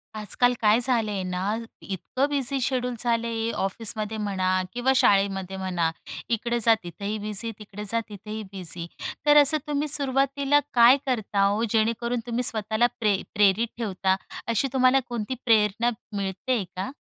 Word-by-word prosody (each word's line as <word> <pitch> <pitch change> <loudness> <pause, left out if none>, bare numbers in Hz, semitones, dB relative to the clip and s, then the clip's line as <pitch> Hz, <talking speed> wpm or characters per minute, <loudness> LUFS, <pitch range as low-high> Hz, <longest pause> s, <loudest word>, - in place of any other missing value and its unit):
आजकाल 230 +4 +1
काय 215 +2 +4
झाले 235 -4 +2
आहे 195 -2 -3
ना, 185 +3 -2 0.3
इतकं 225 +8 -2
बिझी 275 -1 0
शेड्यूल 250 -1 -1
झालं 235 -1 0
आहे. 225 0 -2
ऑफिसमध्ये 215 +2 -2
म्हणा 185 -3 0
किंवा 245 +2 +1
शाळेमध्ये 195 -4 +2
म्हणा, 180 -3 -1 0.4
इकडे 235 +1 0
जा 230 - +7
तिथंही 200 +5 -5
बिझी, 210 +2 -3
तिकडे 210 0 -9
जा 230 - +1
तिथंही 210 +1 -7
बिझी. 175 -3 -4 0.4
तर 295 0 +6
असं 290 +2 +5
तुम्ही 295 0 -1
सुरुवातीला 275 0 +2
काय 240 +2 +7
करता 210 -6 +1
ओ? 215 +3 0
जेणेकरून 230 +2 0
तुम्ही 240 +1 -1
स्वतःला 220 +1 +2
प्रे 210 -4 +1
प्रेरित 205 +2 +3
ठेवता. 190 -4 0 0.3
अशी 230 +3 +1
तुम्हाला 260 0 +4
कोणती 240 +1 -3
प्रेरणा 220 0 +3 0.3
मिळतेय 200 +4 -2
का? 185 +6 -4
220 Hz, 150 wpm, -25 LUFS, 200-245 Hz, 0.4 s, जा